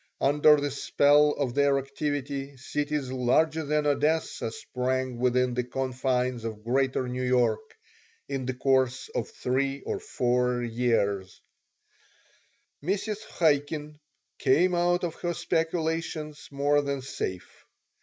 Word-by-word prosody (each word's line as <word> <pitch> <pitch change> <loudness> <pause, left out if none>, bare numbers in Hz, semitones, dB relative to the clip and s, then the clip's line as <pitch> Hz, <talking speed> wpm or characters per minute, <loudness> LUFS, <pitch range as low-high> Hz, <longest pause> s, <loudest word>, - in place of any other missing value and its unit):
Under 150 +2 +5
the 145 0 -2
spell 145 +2 +4
of 135 -4 -2
their 140 0 +3
activity 140 0 -3
cities 145 0 -2
larger 155 +6 +2
than 150 0 0
Odessa 150 -2 +1
sprang 130 +3 -2
up - - -10
within 125 0 +2
the 125 0 0
confines 130 -1 -1
of 110 -2 -6
Greater 130 +1 +1
New 125 +1 -3
York 120 -4 +1 0.5
in 135 -2 -3
the 130 - -2
course 130 -1 +1
of 115 - -3
three 135 +2 -1
or - - -3
four 125 0 0
years 110 -5 0 1.4
Mrs. 205 +4 -1 0.2
Chaikin 150 -1 +1 0.4
came 160 +7 +3
out 175 +1 +2
of 170 -2 -1
her 175 -1 -1
speculations 160 -2 -2
more 145 +1 +2
than 140 -2 -3
safe. 95 -8 -6
135 Hz, 125 wpm, -27 LUFS, 125-150 Hz, 1.4 s, Under